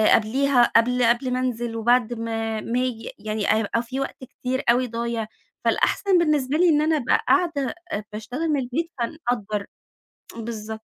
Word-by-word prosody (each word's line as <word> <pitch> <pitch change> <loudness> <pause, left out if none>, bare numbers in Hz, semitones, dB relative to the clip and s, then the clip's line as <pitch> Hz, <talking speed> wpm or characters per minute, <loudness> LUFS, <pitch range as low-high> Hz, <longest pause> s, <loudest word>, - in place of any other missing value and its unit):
قبليها، 260 +3 +3
قبل 245 +2 +4
قبل 240 +2 +2
ما 255 - 0
أنزِل 240 -2 -2
وبعد 240 +1 +2
ما 225 -1 -3
ما 240 +2 -1
آجي، 250 -3 -3
يعني 215 0 -2
هيبقى 220 +2 +1
في 260 +3 -5
وقت 270 -1 -5
كتير 255 +1 -3
أوي 250 +1 +3
ضايع، 230 -1 -3 0.4
فالأحسن 390 -3 +2
بالنسبة 300 -4 +2
لي 355 0 +5
إن 300 -1 +4
أنا 315 0 +2
أبقى 245 - +2
قاعدة 320 -7 +2 0.4
باشتغل 250 +9 -3
من 290 -2 +2
البيت، 285 +7 -2
فنقدّر. 230 -6 -2 0.7
بالضبط. 220 -1 -6
245 Hz, 155 wpm, -24 LUFS, 225-270 Hz, 0.7 s, لي